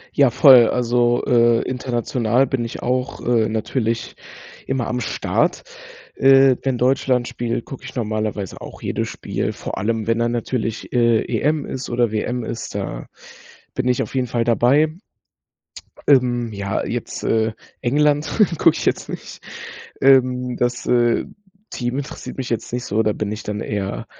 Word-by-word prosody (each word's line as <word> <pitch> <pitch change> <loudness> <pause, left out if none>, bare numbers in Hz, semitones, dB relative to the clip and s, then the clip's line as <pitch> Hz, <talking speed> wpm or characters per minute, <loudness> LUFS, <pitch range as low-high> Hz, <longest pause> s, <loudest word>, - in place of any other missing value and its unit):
Ja, 140 -2 +5
voll, 125 -1 +7
also, 120 0 +1
äh, 120 -1 +4
international 125 -1 0
bin 130 -3 -2
ich 115 - -7
auch, 125 +2 -1
äh, 115 -2 +2
natürlich 115 +1 -2 0.5
immer 130 -3 -1
am 125 - -2
Start. 115 - -1 0.5
Äh, 135 -1 +5
wenn 130 -2 -1
Deutschland 125 -1 +1
spielt, 120 -1 -3
gucke 135 - -9
ich - - -9
normalerweise 110 -4 -3
auch - - -10
jedes - - -2
Spiel, - - -3
vor - - -6
allem 110 +1 -1
wenn 115 0 +1
dann 120 0 +1
natürlich, 115 -1 -3
äh, 115 -2 +4
EM 145 +5 0
ist 130 -1 -6
oder 120 -2 +1
WM 120 +3 -2
ist, 115 - -6
da - - -4 0.7
bin 130 - -2
ich 125 -1 +2
auf - - -7
jeden 130 -1 0
Fall 120 -1 -1
dabei. 135 +7 +3 1.1
Ähm, 120 -4 +3
ja 100 -1 -3
jetzt, - - -5
äh, 110 0 +1 0.3
England 145 +3 +2 0.3
gucke - - +4
ich - - -4
jetzt - - -1
nicht. - - -8 0.6
Ähm, 125 -2 +3
das, 120 0 -1
äh, 120 -1 +2 0.4
Team 125 +1 -3
interessiert 140 - -6
mich 130 - -4
jetzt 115 0 -3
nicht 125 +1 -3
so, 105 +3 +1
da 110 -1 +1
bin 105 0 -3
ich 110 +1 -5
dann 105 0 -4
eher 100 -2 -3
120 Hz, 160 wpm, -20 LUFS, 115-130 Hz, 1.1 s, voll